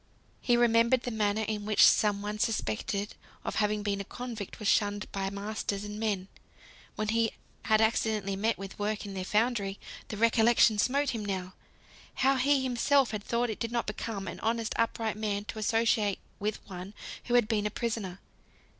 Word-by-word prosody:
He 240 -1 +3
remembered 235 +1 +4
the 245 - -3
manner 215 -1 0
in 210 -1 -3
which 215 0 +5
some 205 -1 +4
one 210 +1 -4
suspected 205 - -1 0.3
of - - -3
having 210 -1 +1
been 200 -1 -1
a - - -4
convict 230 -1 -7
was 210 - -4
shunned 205 0 +2
by 195 -1 -2
masters 200 0 -3
and 210 0 -6
men, 205 -4 -1 0.7
when 215 0 -2
he 230 0 +2 0.4
had 215 0 +4
accidentally 220 -3 +1
met 220 +4 0
with 195 +1 -8
work 210 +1 -2
in 200 - -6
their 190 -1 -3
foundry; 210 -1 0 0.3
the 215 - -6
recollection 225 -1 +4
smote 275 +6 +2
him 225 -3 -4
now, 190 -2 -3 0.6
how 270 +1 +3
he 275 +1 +3
himself 260 +1 +2
had 210 -2 -4
thought 235 +2 -1
that 235 - -2
it - - -13
did 230 -1 -2
not 235 -1 0
become 210 -2 -4
an 170 - -6
honest 225 0 -1
upright 225 -1 0
man 205 -1 -2
to 220 - -6
associate 220 -2 +2 0.2
with 210 +1 -3
one 185 +2 -8 0.3
who 245 - +1
had 240 -3 +5
been 210 -2 +1
a - - -2
prisoner. 210 -5 -3
215 Hz, 185 wpm, -30 LUFS, 205-230 Hz, 0.7 s, which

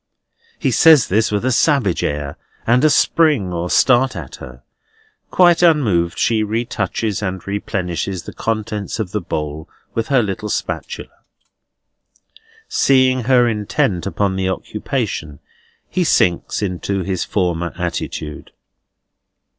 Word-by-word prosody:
He - - 0
says 160 -6 +6
this 110 +3 +2
with 105 +3 -1
a 130 - +2
savage 125 - +2
air, 75 0 -3 0.3
and 120 +4 +3
a 155 - +6
spring 145 - +2
or 85 +1 -3
start 130 +4 +3
at - - -8
her. - - -11 0.7
Quite 175 -2 +4
unmoved 110 - +3
she 110 -2 +2
retouches 110 -1 -2
and 95 -3 -4
replenishes 95 -2 -3
the - - -9
contents 110 -3 -3
of 100 -5 -3
the 105 - -2
bowl 75 -2 -5 0.2
with 115 -1 -2
her 135 -4 +3
little 105 +1 -4
spatula. - - -4 1.6
Seeing 130 -2 +3
her 125 -1 +4
intent 105 -4 -1
upon 100 -1 -1
the 95 0 0
occupation, 105 - -3 0.5
he 185 - 0
sinks 90 - +1
into 95 0 -2
his 95 0 -2
former 85 -3 -1
attitude. 85 -3 -4
105 Hz, 125 wpm, -19 LUFS, 90-125 Hz, 1.6 s, says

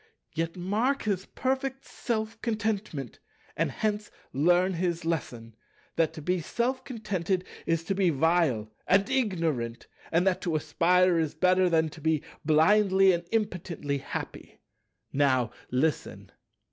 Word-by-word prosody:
Yet 165 +2 -2
mark 220 +10 0
his 195 -3 -1
perfect 265 0 -2
self 220 -2 -3
contentment, 210 - -2 0.4
and - - +1
hence 210 -1 -2 0.2
learn 175 +6 +3
his 170 -1 -2
lesson, 120 -9 -3 0.4
that 165 -2 +2
to 155 - -9
be 180 +2 0
self 250 +9 -1
contented 190 -7 -2 0.2
is 165 0 +1
to 180 - -1
be 190 -2 +2
vile 150 -8 +1
and 195 +2 +4
ignorant, 165 - -1 0.3
and 170 +3 +3
that 190 -2 +2
to 170 -3 -1
aspire 180 +3 +3
is 160 -1 -1
better 185 +2 +3
than 160 -1 +2
to 155 +1 -13
be 160 -1 +1 0.2
blindly 190 +5 +5
and 170 -1 -1
impotently 175 -9 -2
happy. - - -7 0.5
Now 130 -4 +2 0.2
listen." 145 +5 -1
175 Hz, 135 wpm, -28 LUFS, 155-205 Hz, 0.5 s, blindly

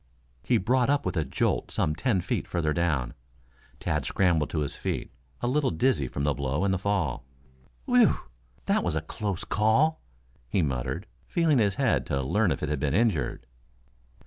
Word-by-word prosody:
He - - +2
brought 125 +6 +2
up 145 0 +2
with - - -2
a 80 - +1
jolt - - -1
some 75 - 0
ten 100 - 0
feet - - -2
further 80 -3 0
down. 75 -7 0 0.7
Tad - - -1
scrambled 85 -6 +1
to 80 - -1
his 70 - -3
feet - - -3 0.3
a - - 0
little 140 +2 +2
dizzy 80 - +1
from 70 - -4
the 75 0 +2
blow 70 +6 -1
and 95 - +2
the 95 - 0
fall. 95 -11 -1 0.6
"Whew! 245 -3 +5 0.5
That - - +2
was 85 -3 -1
a 80 - 0
close 100 +3 -4
call," 110 +9 +2 0.5
he 90 +6 +1
muttered, 65 -4 -2 0.2
feeling 160 -6 +2
his 100 -3 +2
head - - +1
to 70 - 0
learn 100 +7 +2
if 70 - -2
it - - -1
had 75 -2 -1
been 70 +2 0
injured. 100 - +1
90 Hz, 180 wpm, -27 LUFS, 75-115 Hz, 0.7 s, Whew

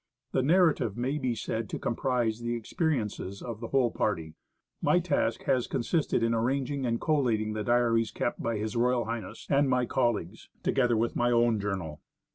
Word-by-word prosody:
The 130 - +2
narrative 155 - +3
may 130 +5 -1
be 125 -4 -1
said 110 -2 -3
to - - -3
comprise 120 -2 0
the 120 0 -2
experiences 115 - -2
of 115 -3 -6
the 115 - -5
whole 130 -3 +2
party. 80 -7 -2 0.5
My - - +3
task - - 0
has 125 -2 +1
consisted 135 -1 0
in 115 0 +2
arranging 130 +3 0
and 115 0 0
collating 115 -8 +1
the 110 0 -3
diaries 115 -1 +2
kept 120 - -3
by 115 - -1
H.R.H. 115 +1 -1
and 140 0 +4
my 125 -1 +2
colleagues, 115 -6 -1
together 120 -4 +2
with 115 +2 0
my 120 0 +2
own 120 -2 +3
journal. 95 -7 -4
120 Hz, 165 wpm, -29 LUFS, 110-130 Hz, 0.5 s, and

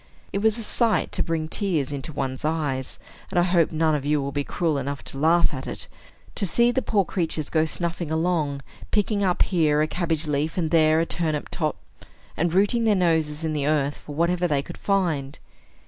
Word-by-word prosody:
It 200 - 0
was 220 +1 +2
a 230 - -4
sight 230 +1 +2
to - - -2
bring 165 -2 -1
tears 160 -7 -1
into 140 +3 -3
one's 135 -3 -3
eyes 150 -5 -1 0.3
(and - - -3
I 175 - +5
hope 175 -2 +2
none 160 0 +2
of 145 -2 -1
you 150 +1 +1
will 140 0 -3
be 145 0 -1
cruel 160 -1 -1
enough 140 +1 -4
to 135 - -6
laugh 165 +3 +4
at - - -5
it), - - -5 0.5
to 200 - -2
see 235 +7 +3
the 260 - 0
poor 205 -6 +1
creatures 160 -4 -2
go 160 -1 +3
snuffing 170 0 -3
along, 160 -4 0 0.3
picking 210 -1 +1
up 180 -2 +3
here 155 -5 +2
a - - 0
cabbage 165 -2 -1
leaf 150 +2 -1
and 160 -3 0
there 160 -1 +4
a - - +1
turnip 155 -4 -2
top, - - -1 0.6
and 170 +1 0
rooting 205 +6 +2
their 215 -2 +4
noses 160 -4 +1
in 160 -1 -1
the 145 -1 -1
earth 145 -2 +1
for 145 - -9
whatever 175 +2 +1
they 145 -3 0
could - - -10
find. 165 -9 0
160 Hz, 210 wpm, -24 LUFS, 150-180 Hz, 0.6 s, I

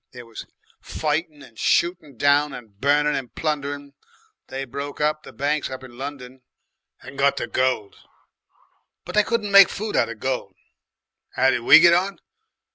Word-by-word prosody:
There 125 -1 -10
was 115 -1 -10 0.3
fightin' 155 -1 -3
and 115 - -16
shootin' 170 -6 0
down, 145 +1 +2
and 110 -6 -11
burnin' 150 +2 +2
and 130 -4 -5
plundering. 145 -2 -3 0.5
They 135 +1 -5
broke 140 +3 -7
up 150 0 0
the - - -13
banks 145 +2 -2
up 130 0 -8
in 125 -2 -12
London 130 -1 -8 0.6
and 135 +1 -11
got 140 0 +3
the - - -2
gold, 130 -6 -1 1.1
but - - -8
they 210 - +5
couldn't 210 -1 -2
make 200 -1 +8
food 215 +1 -5
out - - +2
of 110 -2 -8
gold. 130 +1 -3 0.8
'Ow 130 +1 +4
did 125 -2 -1
we 120 - +8
get 170 0 +6
on? 190 +3 0
140 Hz, 165 wpm, -22 LUFS, 130-155 Hz, 1.1 s, make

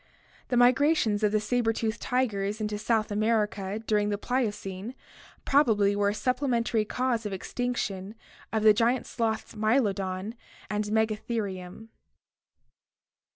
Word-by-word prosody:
The 250 - -1
migra 255 +6 +5
tions 210 -5 +1
of 210 -1 +2
the 215 - +2
saber 225 +2 +1
tooth 225 0 -2
tigers 210 -5 -1
into 210 -1 -2
South 220 -1 0
America 210 -1 0
during 210 -1 +1
the 205 - -1
Pliocene 210 -2 -3 0.5
probably 215 -8 +3
were 200 0 +2
a - - -1
supplementary 235 -2 0
cause 250 0 -1
of 200 - -5
extinction 205 -2 -3 0.4
of 220 -1 0
the 215 -1 +8
giant 235 +3 +1
sloths 225 -2 -2
Mylodon 210 -3 0 0.4
and 210 0 -1
Megatherium. 215 -2 -2
220 Hz, 125 wpm, -28 LUFS, 205-235 Hz, 0.5 s, the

